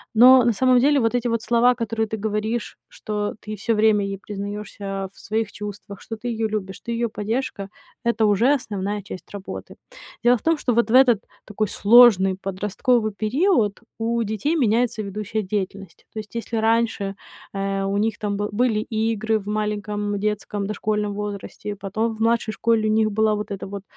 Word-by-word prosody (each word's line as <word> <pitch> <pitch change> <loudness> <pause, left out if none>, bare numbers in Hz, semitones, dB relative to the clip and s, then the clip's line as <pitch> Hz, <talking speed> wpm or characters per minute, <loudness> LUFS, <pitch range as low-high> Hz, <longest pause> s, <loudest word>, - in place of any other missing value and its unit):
Но, 250 +2 +8
на 235 - +3
самом 255 +3 +4
деле, 285 +3 +4
вот 230 -1 +1
эти 245 0 0
вот 230 -1 0
слова, 240 +2 +3
которые 225 -1 -2
ты 220 - -4
говоришь, 215 +2 -2
что 210 -1 -4
ты 210 - -12
всё 215 +2 -1
время 215 -1 +4
ей 195 0 -3
признаёшься 200 -1 -5
в - - -19
своих 220 0 -2
чувствах, 205 -1 -8
что 225 - -6
ты 220 - -16
её 225 -2 -1
любишь, 195 -3 -4
ты - - 0
её 235 - +1
поддержка- 215 -1 -3 0.4
это 235 -1 +1
уже 225 +7 +4
основная 205 -5 -3
часть 185 -3 -9
работы. 195 -1 -7 0.5
Дело 240 +1 +6
в - - -17
том, 330 0 +2
что 250 -4 0
вот 235 -1 +2
в 230 - 0
этот 240 -4 +3 0.3
такой 215 0 -2
сложный 200 -4 +6
подростковый 210 +4 0
период 235 - +1 0.2
у 230 +1 0
детей 220 - -1
меняется 230 -3 +1
ведущая 210 +1 -3
деятельность. 195 -2 -5
То 220 - -5
есть 215 +1 -10
если 230 0 -2
раньше, 220 -3 +1 0.4
а, 195 0 -2
у 200 - -1
них 215 0 0
там 205 -1 -2
был 205 0 -2
были 220 0 +1
игры 220 0 0
в 200 - -9
маленьком 210 -1 -2
детском 210 -1 -2
дошкольном 210 0 -1
возрасте, 205 0 -6
и 205 - -3
потом 215 +3 -2
в 220 - -10
младшей 230 -1 +1
школе 225 -1 +1
у 215 - +2
них 220 0 +3
было 215 +1 +2
вот 210 0 -5
это 200 0 -5
вот, 200 -1 -6
215 Hz, 190 wpm, -23 LUFS, 205-230 Hz, 0.5 s, Но